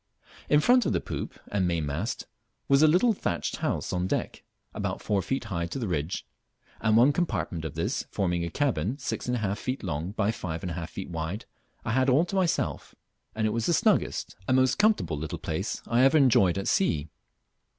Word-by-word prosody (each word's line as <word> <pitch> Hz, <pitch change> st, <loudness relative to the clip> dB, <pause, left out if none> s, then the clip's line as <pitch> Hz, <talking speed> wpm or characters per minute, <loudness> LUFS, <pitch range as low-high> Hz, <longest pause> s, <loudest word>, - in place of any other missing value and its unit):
In 150 Hz, 0 st, +5 dB
front 245 Hz, +7 st, +4 dB
of -, -, +1 dB
the -, -, +2 dB
poop -, -, -6 dB
and 95 Hz, -3 st, +1 dB
mainmast 85 Hz, -, -2 dB, 0.4 s
was 140 Hz, +1 st, +5 dB
a 155 Hz, -, +7 dB
little 185 Hz, +9 st, +4 dB
thatched 85 Hz, -, -2 dB
house -, -, -2 dB
on 90 Hz, 0 st, 0 dB
deck, -, -, -2 dB, 0.3 s
about -, -, -3 dB
four 100 Hz, -2 st, 0 dB
feet 135 Hz, +9 st, -2 dB
high 85 Hz, -7 st, -3 dB
to 85 Hz, -, -5 dB
the 120 Hz, -5 st, -2 dB
ridge; 80 Hz, 0 st, -2 dB, 0.5 s
and 110 Hz, 0 st, +3 dB
one 130 Hz, +5 st, +6 dB
compartment 95 Hz, -, -2 dB
of 80 Hz, -, -5 dB
this, -, -, -2 dB
forming 90 Hz, -3 st, 0 dB
a 85 Hz, -, -2 dB
cabin 115 Hz, -, 0 dB
six 135 Hz, -, -4 dB
and 125 Hz, -, +1 dB
a -, -, -1 dB
half 100 Hz, 0 st, -1 dB
feet 130 Hz, +1 st, -3 dB
long 85 Hz, +1 st, -3 dB
by 105 Hz, -1 st, +1 dB
five 85 Hz, -6 st, -5 dB
and 90 Hz, -, -3 dB
a -, -, -3 dB
half 85 Hz, 0 st, -7 dB
wide, 85 Hz, +6 st, -4 dB, 0.4 s
I -, -, -1 dB
had 130 Hz, +3 st, +3 dB
all 140 Hz, +7 st, +4 dB
to 185 Hz, -, -5 dB
myself, 185 Hz, -3 st, -1 dB, 0.4 s
and 110 Hz, 0 st, 0 dB
it 110 Hz, -, +2 dB
was 115 Hz, -1 st, -1 dB
the 170 Hz, -, +3 dB
snuggest -, -, +1 dB
and 130 Hz, -, +3 dB
most 130 Hz, +6 st, +3 dB
comfortable 210 Hz, -, +2 dB
little 80 Hz, 0 st, -4 dB
place -, -, -3 dB
I 120 Hz, +1 st, +2 dB
ever 135 Hz, +4 st, +6 dB
enjoyed 110 Hz, -, +4 dB
at 100 Hz, -, -2 dB
sea. 80 Hz, -, +1 dB
105 Hz, 205 wpm, -27 LUFS, 85-135 Hz, 0.5 s, a